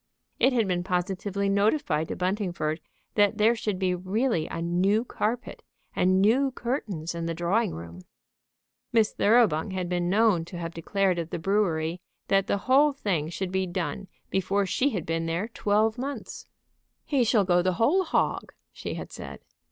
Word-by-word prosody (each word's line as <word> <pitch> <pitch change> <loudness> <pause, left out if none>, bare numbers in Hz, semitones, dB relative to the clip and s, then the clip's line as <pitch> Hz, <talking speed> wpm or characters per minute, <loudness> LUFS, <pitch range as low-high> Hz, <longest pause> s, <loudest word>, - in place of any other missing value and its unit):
It 265 - +5
had 230 -5 +1
been 175 -1 0
positively 190 +2 -1
notified 200 - +1
to - - -4
Buntingford 180 -5 -1 0.3
that 205 0 +3
there 225 +2 +4
should 210 -4 -2
be 185 -1 +1
really 185 0 0
a - - -5
new 185 +7 +1
carpet 240 +1 -3 0.3
and 185 +1 +3
new 245 +8 +4
curtains 220 - -3
in 170 0 -4
the 165 - -2
drawing 185 +5 0
room. 85 +2 -9 0.9
Miss 225 -2 +3
Thoroughbung 210 -6 +3
had 185 -1 -2
been 175 -1 0
known 205 -3 +3
to 175 - -8
have 165 -1 -5
declared 185 +2 0
at 165 -1 -4
the - - -3
brewery 170 -2 0 0.3
that 195 -1 +3
the - - +1
whole 280 +3 +5
thing 180 - -1
should 180 +2 -4
be 190 0 0
done 185 +2 -3 0.2
before 195 +1 +1
she 255 +9 +1
had 190 - -3
been 165 0 -1
there 170 +6 -1
twelve 220 +1 +1
months. 275 +2 -6 0.6
"He 275 -4 +2
shall 220 -2 +3
go 180 -1 +3
the 185 +1 +1
whole 290 - +3
hog," 335 - -1 0.2
she - - -6
had - - -7
said. - - -9
195 Hz, 170 wpm, -27 LUFS, 175-220 Hz, 0.9 s, It